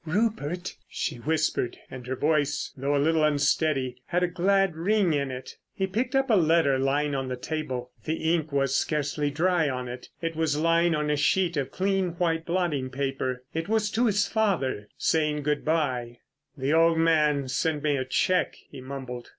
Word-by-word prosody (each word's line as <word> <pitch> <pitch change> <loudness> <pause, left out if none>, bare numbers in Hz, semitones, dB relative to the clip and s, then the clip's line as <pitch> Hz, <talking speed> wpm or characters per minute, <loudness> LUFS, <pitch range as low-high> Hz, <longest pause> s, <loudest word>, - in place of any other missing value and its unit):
"Rupert," 180 -2 -1
she - - -3
whispered, 150 -1 -1
and 125 -2 -8
her 130 - -2
voice, 150 0 0
though 140 +1 -1
a - - +3
little 155 +2 +2
unsteady, 145 -3 +1
had 180 +1 +1
a - - +3
glad 190 +1 +2
ring 185 +1 +2
in 140 -2 0
it. 130 0 -8 0.2
He 190 - 0
picked 235 +7 -2
up 270 -2 +2
a - - +6
letter 160 -6 +3
lying 145 +2 +1
on 135 -1 -2
the 130 - -3
table. 130 -3 -4
The 160 +1 0
ink 160 -3 -1
was 135 -1 +1
scarcely 150 0 0
dry 165 +1 +1
on 125 -1 -3
it. 125 +1 -8
It 165 -1 -3
was 155 -2 0
lying 165 +1 +3
on 150 0 0
a - - +2
sheet 170 +4 +2
of 140 -3 -1
clean 190 -2 0
white 165 -2 -1
blotting 170 -7 0
paper. 130 -1 -3
It 165 +3 -3
was 215 -2 +1
to 235 +2 +2
his 205 -1 +2
father—saying 150 - 0
good 150 0 0
bye. 130 -7 -1 0.4
"The 135 +2 0
old 165 0 +4
man 150 -4 +3
sent 150 +3 -1
me 150 -2 +2
a 130 - -1
cheque," 180 +8 +1 0.2
he 135 - -9
mumbled. 130 -2 -7
155 Hz, 185 wpm, -26 LUFS, 135-170 Hz, 0.4 s, a